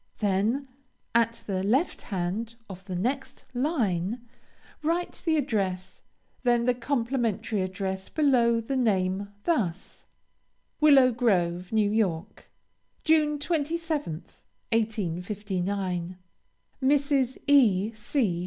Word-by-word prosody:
Then, 215 +7 0 0.5
at 230 0 +2
the 190 -3 -1
left 250 - +1
hand 200 +5 -3
of 190 -1 -9
the 185 -3 -5
next 255 +9 -3
line, 240 - -1 0.5
write 335 +3 -1
the 320 -2 +3
address, 195 -9 -2 0.4
then 240 -1 +2
the 250 - +3
complimentary 235 -4 -1
address 190 0 -3
below 240 -6 +3
the 270 +4 -3
name; 200 -5 +1 0.2
thus 195 - -2 0.7
WILLOW 280 -4 +7
GROVE, 180 -7 +1
NEW 215 -2 +2
YORK, 205 -3 -1 0.5
June 305 -2 +3
27th, 305 - -2 0.3
1859. 190 -3 -2 0.6
MRS. 275 -1 +2
E. 225 -8 +4
C. 215 - 0
225 Hz, 95 wpm, -27 LUFS, 190-270 Hz, 0.7 s, WILLOW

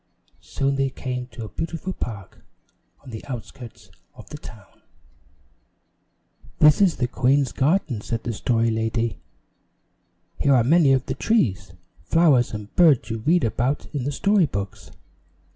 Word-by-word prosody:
Soon 135 +11 -2
they 135 0 +1
came 125 -1 -5
to 120 -2 -8
a - - -9
beautiful 165 - -5
park 105 - -7 0.6
on 130 - -11
the 110 - -8
outskirts 125 -1 -9 0.2
of - - -13
the - - -6
town. - - -14 1.8
"This 150 +4 +5
is 190 -4 +4
the 125 - -1
Queen's 135 +1 +1
Garden," 140 - 0
said 115 +1 -4
the 120 - -3
Story 115 +1 0
Lady. 115 +1 -2 1.2
"Here 140 -1 +4
are 120 - +4
many 150 +2 +4
of 130 -1 +2
the - - -3
trees, 130 - 0 0.3
flowers 135 - +3
and 105 -1 -8
birds 155 -9 +4
you 115 - -3
read 170 +10 +2
about 120 +5 -1
in 140 -4 -2
the 140 - -2
story 200 +3 +2
books." 100 -6 -6
130 Hz, 145 wpm, -23 LUFS, 115-150 Hz, 1.8 s, This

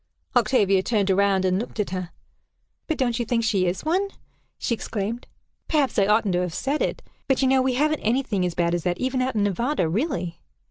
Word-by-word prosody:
Octavia 215 -5 +3
turned 200 -2 +1
around, 195 0 +3
and 185 0 +2
looked 230 0 -6
at 205 - -1
her. 185 -2 -3 0.8
"But 320 - -1
don't 245 -3 0
you - - +1
think 230 0 0
she 195 -5 +2
is 180 +9 -3
one?" 375 +5 +1 0.5
she - - -1
exclaimed. 225 +1 -4 0.4
"Perhaps 285 -8 +1
I 195 - +3
oughtn't 210 -2 +3
to 175 - +1
have 180 -2 -3
said 280 +2 -1
it; - - -1 0.2
but 270 0 +2
you - - +4
know 265 0 +4
we 255 -1 +1
haven't 305 +3 +2
any 245 +5 +1
thing 205 -7 -1
as 180 -2 -1
bad 170 0 +1
as 175 - 0
that, 175 +1 -1
even 255 0 0
out 255 -1 -1
in 210 - +2
Nevada 205 - 0
really!" 185 - -2
220 Hz, 220 wpm, -24 LUFS, 190-260 Hz, 0.8 s, you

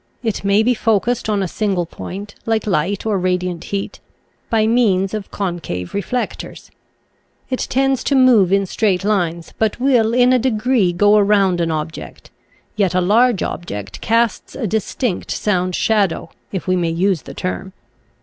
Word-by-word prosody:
It 220 -4 -2
may 200 +2 +3
be 250 +2 +3
focussed 225 +1 0
on 205 -2 +1
a - - -1
single 190 -2 -1
point, 200 +5 -8
like 225 -1 0
light 195 +1 -1
or 210 -3 +1
radiant 180 -1 -1
heat, 200 -1 -4 0.5
by 220 -1 +2
means 210 -5 +2
of 215 -2 -4
concave 170 - -4
reflectors. 245 +5 -4 0.8
It 255 - -1
tends 270 0 +1
to 280 - +2
move 245 -8 +5
in 195 0 +3
straight 190 -1 0
lines, 175 -5 -1
but 220 +1 0
will 240 -4 +3
in 250 0 +5
a 255 - +4
degree 235 -4 +1
go 205 +4 +4
around 200 -3 +3
an 165 - 0
object; 160 0 -6 0.4
yet 195 -4 +1
a - - +4
large 215 +4 +3
object 100 - -6
casts 230 0 0
a 250 - -3
distinct 220 0 -2
sound 185 -3 0
shadow, 205 -6 0 0.2
if 190 - -4
we 185 - +1
may 175 -2 0
use 175 0 +1
the - - -11
term. 185 +1 -4
200 Hz, 160 wpm, -19 LUFS, 180-225 Hz, 0.8 s, move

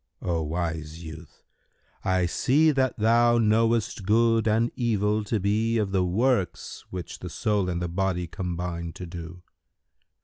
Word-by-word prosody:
"—"O 85 -3 0
wise 80 0 -4
youth, 80 -1 -11 0.6
I 95 -1 +2
see 145 - +3
that 130 -3 0
thou 120 +2 +4
knowest 115 -1 +2
good 115 +2 +3
and 115 +2 +2
evil 105 -3 +1
to 110 +2 -1
be 110 +4 +1
of 105 -3 0
the 95 -1 +2
works 100 +1 0
which 90 -3 -7
the - - -6
soul 105 -4 0
and 85 -1 -2
the 90 - -2
body 90 0 -1
combine 85 -1 -4
to 90 - -7
do. 90 0 -9
95 Hz, 145 wpm, -26 LUFS, 85-115 Hz, 0.6 s, thou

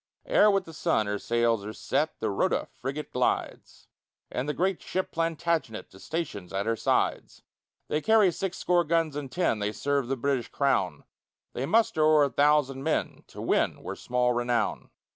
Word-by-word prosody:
Ere 210 - +5
with 195 -2 +1
the 165 - -11
sun 150 -8 +1
her 105 0 -2
sails 115 -2 +1
are 105 +1 -6
set - - -1
The - - -1
Rota - - 0
frigate 140 +3 -6
glides - - -2 0.4
And 130 +4 -2
the - - 0
great 185 +1 0
ship 185 0 -3
Plantagenet 165 -7 -2
To 95 - -15
stations 105 - -5
at 100 +1 -2
her 115 0 +1
sides: - - -1 0.4
They 150 - -1
carry 220 -2 +4
six 190 +2 -4
score 175 -1 +2
guns 165 -2 0
and 140 -3 -5
ten, 170 -10 0
They 105 0 -1
serve 140 +2 -1
the 135 +1 -1
British 130 -2 -1
crown, 125 - 0 0.5
They 130 +3 -3
muster 215 -7 +3
o'er 155 -1 +5
a 140 - +2
thousand 145 0 +2
men 155 +2 -2
To - - -9
win - - 0
were - - -5
small 125 0 0
renown. 120 0 -1
140 Hz, 180 wpm, -27 LUFS, 120-165 Hz, 0.5 s, Ere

